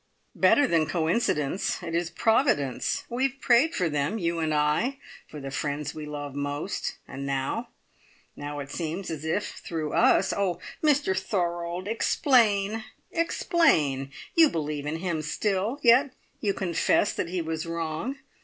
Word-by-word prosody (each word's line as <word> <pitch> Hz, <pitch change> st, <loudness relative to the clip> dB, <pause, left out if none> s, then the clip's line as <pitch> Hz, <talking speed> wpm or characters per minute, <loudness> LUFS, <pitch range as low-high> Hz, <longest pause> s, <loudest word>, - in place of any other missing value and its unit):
"Better 290 Hz, -, +5 dB
than 165 Hz, -, +2 dB
coincidence! 160 Hz, -1 st, 0 dB
It 165 Hz, -1 st, -5 dB
is 170 Hz, 0 st, 0 dB
Providence. 175 Hz, -, +1 dB
We 255 Hz, +3 st, +1 dB
have 270 Hz, +1 st, -13 dB
prayed 255 Hz, +7 st, +4 dB
for 180 Hz, -, +1 dB
them, 150 Hz, +6 st, -1 dB
you 170 Hz, -4 st, -1 dB
and 160 Hz, -1 st, 0 dB
I, 150 Hz, -, +1 dB, 0.3 s
for 150 Hz, -, -9 dB
the 135 Hz, -1 st, -6 dB
friends 145 Hz, +1 st, -3 dB
we 155 Hz, -1 st, -7 dB
love 145 Hz, -2 st, -5 dB
most, 145 Hz, +6 st, -3 dB
and 135 Hz, +1 st, -7 dB
now 135 Hz, -1 st, -2 dB, 0.7 s
now 145 Hz, 0 st, -6 dB
it 140 Hz, 0 st, -8 dB
seems 170 Hz, +3 st, -4 dB
as 155 Hz, -2 st, -5 dB
if 170 Hz, +6 st, -1 dB
through 160 Hz, -3 st, -3 dB
us 190 Hz, -, +4 dB
Oh, 190 Hz, -4 st, 0 dB, 0.3 s
Mr 290 Hz, -10 st, +3 dB
Thorold, 175 Hz, -1 st, -2 dB
explain! 220 Hz, -2 st, +2 dB, 0.3 s
Explain! 165 Hz, -, +2 dB, 0.2 s
You 325 Hz, -2 st, +6 dB
believe 150 Hz, -2 st, -3 dB
in 155 Hz, -, -2 dB
him 165 Hz, -2 st, -2 dB
still, 200 Hz, -, -1 dB
yet 255 Hz, +2 st, +5 dB, 0.2 s
you 200 Hz, -3 st, 0 dB
confess 185 Hz, +2 st, +1 dB
that 170 Hz, -, -3 dB
he 180 Hz, -1 st, -2 dB
was 160 Hz, 0 st, -3 dB
wrong. 165 Hz, -, -3 dB
170 Hz, 150 wpm, -27 LUFS, 150-220 Hz, 0.7 s, You